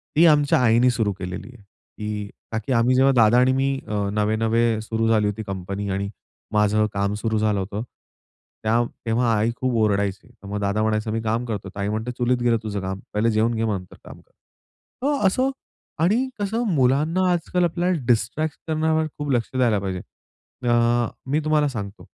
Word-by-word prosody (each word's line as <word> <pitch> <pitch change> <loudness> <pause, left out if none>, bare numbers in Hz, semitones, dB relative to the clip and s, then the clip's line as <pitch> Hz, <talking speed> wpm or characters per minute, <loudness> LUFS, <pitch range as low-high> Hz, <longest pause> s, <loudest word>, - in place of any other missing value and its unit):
ती 165 - +6
आमच्या 145 -4 +4
आईनी 120 +2 +5
सुरू 110 -4 0
केलेली 90 +1 -6
आहे. 110 - -17 0.3
की 105 -1 -4 0.2
ताकी 110 +3 -3
आम्ही 120 +2 +3
जेव्हा 135 +1 +5
दादा 115 +1 +5
आणि 130 +1 +4
मी 135 +1 +1
अ, 105 -2 -1
नवे-नवे 110 +2 +1
सुरू 115 0 -1
झाली 110 -2 +3
होती 105 +2 -3
कंपनी 100 +1 -4
आणि 100 +1 -2 0.4
माझं 105 0 +3
काम 100 0 0
सुरू 110 +1 -1
झालं 105 -2 +1
होतं. 100 +3 -4 0.8
त्याव 115 +2 +2 0.2
तेव्हा 115 +1 +2
आई 110 +3 +1
खूप 130 0 -1
ओरडायची. 100 -1 0
तर 100 - -15
मग 105 +1 -3
दादा 100 +1 0
म्हणायचा, 110 0 0
"मी 115 +1 -1
काम 115 +2 -1
करतो". 105 -4 -4
तर - - -19
मग - - -1
आई 100 - -1
म्हणते, 110 +3 -2
"चुलीत 125 0 +2
गेलं 115 -1 +3
तुझं 105 -2 -3
काम. 95 +1 -4
पाहिलं 110 +2 +2
जेवून 110 +2 +2
घे, 110 - -1
मग 110 -2 +1
नंतर 90 - -14
काम - - -11
कर". - - -33 0.7
तर 280 -6 +1
असं 255 +8 +1 0.5
आणि 225 +9 +2
कसं 220 +4 -1
मुलांना 150 +8 +2
आजकाल 175 +1 0
आपल्याला 175 +1 0
डिस्ट्रॅक्ट 125 +7 0
करण्यावर 160 0 +1
खूप 145 -1 -4
लक्ष 120 -3 0
द्यायला 120 -5 +3
पाहिजे. 95 -2 -3 0.7
अ, 120 0 +3 0.2
मी 150 - +3
तुम्हाला 155 -1 +3
सांगतो. 100 -7 -6
115 Hz, 185 wpm, -23 LUFS, 105-130 Hz, 0.8 s, ती